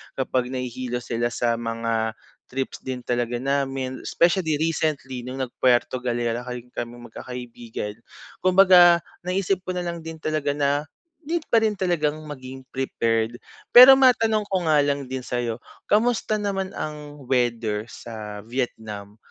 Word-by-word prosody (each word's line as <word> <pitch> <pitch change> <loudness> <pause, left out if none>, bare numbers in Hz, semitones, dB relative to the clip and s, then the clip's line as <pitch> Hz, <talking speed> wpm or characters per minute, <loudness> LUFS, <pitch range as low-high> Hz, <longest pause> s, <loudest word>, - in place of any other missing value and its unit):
kapag 130 -1 0
nahihilo 125 -1 -4
sila 120 0 -1
sa 120 -1 -1
mga 115 -1 -2 0.4
trips 135 0 -4
din 130 -1 -4
talaga 120 0 -1
namin. 135 -1 -2
Specially 170 -3 +2
recently 150 -6 -1
nung 130 +1 -5
nag-Puerto 125 0 +1
Galera 120 -1 -1
kahi 125 -1 -7
kaming 120 0 -7
magkakaibigan. 120 -4 -7 0.5
Kumbaga 180 -2 +7 0.2
naisip 185 0 0
ko 185 - -2
nalang 170 -2 -4
din 165 -1 -8
talaga 155 -2 0
na 145 0 0 0.4
need 330 +3 -1
pa - - +4
rin 215 -1 +2
talagang 165 -6 0
maging 130 -2 -8
prepared. 115 -3 -1 0.3
Pero 255 +2 +11
matanong 225 -5 +4
ko 195 -2 0
nga 155 - +5
lang 140 -1 -1
din 130 -1 -4
sayo, 120 -2 -2 0.3
kamusta 220 0 +2
naman 195 -2 -3
ang 150 -2 -7
weather 115 -4 0
sa 105 -3 -8
Vietnam? 110 -4 -5
130 Hz, 135 wpm, -24 LUFS, 120-170 Hz, 0.5 s, Pero